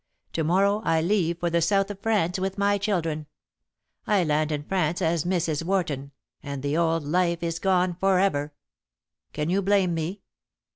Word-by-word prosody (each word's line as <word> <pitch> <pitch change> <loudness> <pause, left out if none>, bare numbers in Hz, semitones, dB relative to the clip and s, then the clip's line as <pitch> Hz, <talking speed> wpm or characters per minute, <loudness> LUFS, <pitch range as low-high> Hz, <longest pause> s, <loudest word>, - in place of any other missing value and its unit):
To 160 - 0
morrow 200 +6 +2
I 165 -4 +2
leave 170 -1 +1
for 175 -1 -1
the 170 0 +2
south 195 +4 +2
of 200 - -9
France 195 -5 0
with 190 +1 -2
my 200 0 +2
children. 165 -7 -1 0.8
I 205 -4 +3
land 155 0 +1
in 145 -1 -2
France 175 -1 0
as 170 -3 0
Mrs. 170 -4 0
Warton, 155 -7 -1 0.3
and 140 -2 -6
the 145 +1 0
old 165 -1 +1
life 170 +2 0
is 165 -1 -2
gone 185 -2 +2
for 195 -1 +3
ever. 150 -6 +1 0.8
Can 150 +2 -2
you 195 +2 +2
blame 195 -2 +2
me?" 170 +5 -4
170 Hz, 175 wpm, -25 LUFS, 160-195 Hz, 0.8 s, I